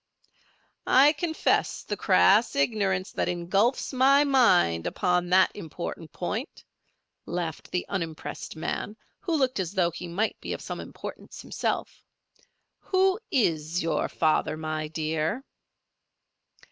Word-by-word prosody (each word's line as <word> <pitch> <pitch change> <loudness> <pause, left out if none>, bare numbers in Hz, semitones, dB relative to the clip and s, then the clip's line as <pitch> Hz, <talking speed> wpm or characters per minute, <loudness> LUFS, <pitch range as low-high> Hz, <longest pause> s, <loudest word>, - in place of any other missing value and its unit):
"I 280 +4 +6
confess 320 +1 0
the 205 - -3
crass 200 +3 +4
ignorance 190 +4 0
that - - -1
engulfs 195 +11 0
my 275 +3 +5
mind 185 - +3
upon 180 -1 0
that 190 +1 +5
important 165 -3 -7
point," 215 - -5 0.6
laughed 170 -3 -4
the 180 - -2
unimpressed 165 -6 -5
man, 205 +6 -4 0.2
who 340 -4 -1
looked 260 -5 +1
as 180 -1 -2
though 175 -3 +2
he 175 +1 -7
might 200 +6 -2
be - - -4
of - - -6
some - - -6
importance - - -9
himself. - - -3 0.8
"Who 380 +1 +2
is 165 - 0
your 165 - 0
father, 155 -1 +1
my 155 -1 -3
dear?" 160 - -2
185 Hz, 120 wpm, -27 LUFS, 165-245 Hz, 0.8 s, I